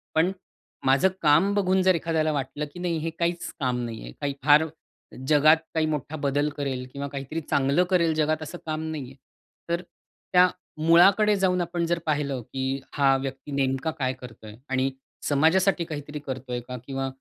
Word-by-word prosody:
पण 165 +4 +3 0.5
माझं 135 +8 +4
काम 165 +6 +4
बघून, 190 -2 +2
जर 185 0 +4
एखाद्याला 160 -1 0
वाटलं 145 +1 -3
की 175 - -9
नाही, 175 -2 -1
"हे 160 +1 -2
काहीच 170 +1 -1
काम 125 -3 0
नाहीये. 110 - -7
काही 140 -1 -1
फार 150 +2 +6 0.6
जगात 155 +2 +6 0.2
काही 160 -1 +2
मोठा 150 0 -3
बदल 145 0 0
करेल 135 -3 -3
किंवा 140 0 -4
काहीतरी 140 +3 -5
चांगलं 140 +3 +2
करेल 170 -4 +3
जगात 155 0 +1
असं 155 +3 -7
काम 155 0 -3
नाहीये." 135 -4 -6 0.5
तर 170 +1 0
त्या 180 0 0 0.4
मुळाकडे 195 +5 +6
जाऊन 185 -2 +2
आपण 170 0 -1
जर 170 0 0
पाहिलं, 145 -4 -1
की 130 +3 -3
हा 140 -2 +4
व्यक्ती 135 +2 -6
नेमका 135 +2 0
काय 130 -1 0
करतोय 110 -4 -11
आणि 130 0 +1 0.4
समाजासाठी 170 +5 +3
काहीतरी 150 -2 -6
करतोय 130 -2 -4
का? 125 0 -5
किंवा 135 -1 -2
150 Hz, 165 wpm, -26 LUFS, 135-170 Hz, 0.6 s, फार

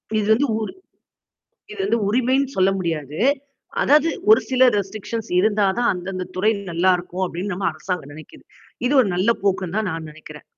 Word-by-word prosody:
இது 210 -1 0
வந்து 255 +6 +2
ஊர். 220 -1 -2 1.1
இது 425 - -11
வந்து 235 - +1
உரிமைன்னு 255 +5 +1
சொல்ல 190 0 +4
முடியாது. 155 -5 -3 0.6
அதாவது 300 +3 +4 0.2
ஒரு 220 - +8
சில 260 -1 0 0.2
ரெஸ்ட்ரிக்ஷன்ஸ் 215 +3 -4
இருந்தா 210 +1 +2
தான் 245 - +2
அந்தந்த 185 +1 -5
துறை 205 +4 +2 0.2
நல்லாயிருக்கும் 180 +1 +1
அப்படின்னு 180 +3 -4
நம்ம 195 +2 -2
அரசாங்கம் 155 -2 -5
நெனைக்கிது. 155 +1 -13 0.4
இது 255 - +1
ஒரு 230 - 0
நல்ல 185 +5 +1
போக்குன்னு 190 -1 0
தான் 215 -3 0
நான் 160 -1 -5
நெனக்கிறேன். 155 0 -13
195 Hz, 160 wpm, -21 LUFS, 175-220 Hz, 1.1 s, ஒரு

